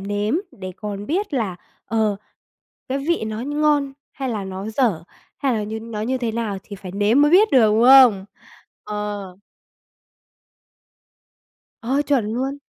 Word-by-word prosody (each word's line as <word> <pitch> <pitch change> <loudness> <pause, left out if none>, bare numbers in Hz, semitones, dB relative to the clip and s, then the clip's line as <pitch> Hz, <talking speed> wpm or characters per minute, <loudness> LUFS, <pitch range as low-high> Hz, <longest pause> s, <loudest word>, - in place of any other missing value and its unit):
nếm 205 +5 -1 0.2
để 185 -1 -8
còn 205 -1 -6
biết 360 0 -2
là, 205 -8 -1 0.3
ờ, 220 -3 0 0.7
cái 270 +1 -1
vị 310 -3 -1
nó 220 +2 -4
nh 290 +2 -3
ngon 290 -2 +2 0.2
hay 270 -1 -4
là 210 -5 -3
nó 190 +2 -6
dở, 215 - 0 0.3
hay 275 -2 0
là 215 - -1
như 220 +1 -5
nó 225 -2 -6
như 255 +4 -1
thế 235 -3 -2
nào 225 -3 -2
thì 200 - -9
phải 185 -1 -9
nếm 210 +8 +3
mới 295 - +4
biết 420 +4 +6
được, 245 -5 +6
đúng 225 +2 +3
không? 250 -7 +7 0.6
Ờ. 205 -3 -5 2.4
Ờ, 265 +5 0
chuẩn 255 -7 0
luôn. 270 +4 -2
225 Hz, 160 wpm, -21 LUFS, 205-270 Hz, 2.4 s, không